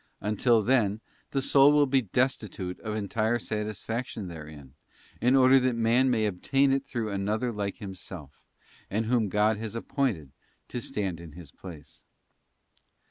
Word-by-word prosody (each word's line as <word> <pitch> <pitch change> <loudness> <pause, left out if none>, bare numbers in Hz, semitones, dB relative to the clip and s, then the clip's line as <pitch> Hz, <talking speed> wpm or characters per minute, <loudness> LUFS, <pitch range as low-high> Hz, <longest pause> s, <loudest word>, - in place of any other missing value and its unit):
Until 110 +2 +2
then, 110 -4 +2 0.3
the 135 -1 -1
soul 140 +1 +6
will 150 -1 +5
be 135 -1 +2
destitute 110 -5 -1
of 110 -1 -4
entire 110 +2 0
satisfaction 110 -1 -4
therein, 75 -5 -10 0.5
in 125 +3 +4
order 130 0 +6
that 130 -1 +1
man 115 +3 +3
may 110 -3 +2
obtain 135 +8 +2
it 135 0 -1
through 115 -4 -3
another 105 +5 -1
like 100 -2 -3
himself, 95 -6 -9 0.5
and 110 +3 -1
whom 115 -3 +1
God 105 +2 +2
has 110 +1 -5
appointed 115 - -2 0.4
to 120 - -4
stand 95 -7 -3
in 85 -3 -11
His 80 -3 -11
place. 80 -5 -12
110 Hz, 145 wpm, -28 LUFS, 95-125 Hz, 0.5 s, soul